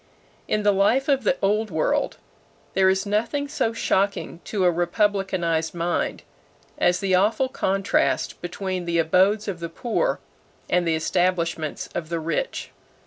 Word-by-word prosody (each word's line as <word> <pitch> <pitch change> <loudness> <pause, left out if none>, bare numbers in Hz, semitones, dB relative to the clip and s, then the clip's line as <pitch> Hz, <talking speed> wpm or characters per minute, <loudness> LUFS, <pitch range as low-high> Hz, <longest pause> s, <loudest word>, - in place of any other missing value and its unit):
In 210 - 0
the 205 - +5
life 210 +8 +2
of 275 -2 +2
the 270 - +2
Old 210 +2 +2
World 240 - 0 0.6
there 190 0 +4
is 190 +1 +1
nothing 230 +8 -1
so 225 -5 0
shocking 200 -5 0
to 195 -4 0
a 175 - +5
republicanized 175 -3 0
mind 170 +1 -1 0.6
as 175 +1 +2
the 195 -2 0
awful 210 +8 +3
contrast 195 -5 0
between 185 +1 -4
the 170 0 0
abodes 190 +6 +3
of 190 -4 -3
the 170 0 -5
poor 240 - -1 0.5
and 180 -1 +1
the 165 - +2
establishments 170 -2 -1
of 160 -2 -4
the 170 -1 -1
rich. 165 - -3
190 Hz, 145 wpm, -24 LUFS, 170-210 Hz, 0.6 s, the